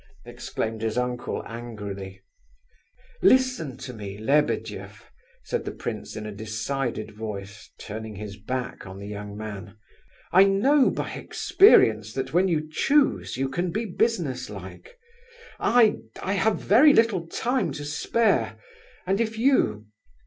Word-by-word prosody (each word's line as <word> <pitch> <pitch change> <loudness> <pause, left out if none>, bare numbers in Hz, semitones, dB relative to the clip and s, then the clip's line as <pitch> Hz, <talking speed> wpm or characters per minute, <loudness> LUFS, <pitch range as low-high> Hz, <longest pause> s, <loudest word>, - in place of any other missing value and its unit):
exclaimed 110 0 -4
his 110 +1 -2
uncle 125 0 -2
angrily. 105 -5 -7 1.0
"Listen 250 - +3
to 130 -1 -8
me, 100 -3 -7
Lebedeff," 140 +8 -1 0.3
said 475 - -2
the - - -4
prince - - -6
in 110 - -6
a 105 - -5
decided 110 +3 -3
voice, 105 -1 -7
turning 110 0 -7
his 100 0 -7
back 125 +2 -5
on 95 +1 -9
the 100 - -8
young 105 0 -7
man. 105 -1 -7 0.5
"I 190 +2 +7
know 255 +9 +4
by - - -3
experience 110 - +4
that 135 +1 -4
when 180 +3 +4
you 155 -3 0
choose, 275 - +1
you 135 +1 0
can 175 +7 -2
be 220 +7 -2
business 170 - -1
like... 95 - -10 0.6
I 230 -3 +5 0.3
have 200 +2 +1
very 275 +9 +6
little 210 -9 +2
time 235 - -1
to 145 +1 -6
spare, 150 - +1 0.5
and 195 +4 +1
if 220 -1 -2
you... 220 - +2
130 Hz, 135 wpm, -25 LUFS, -, 1.0 s, I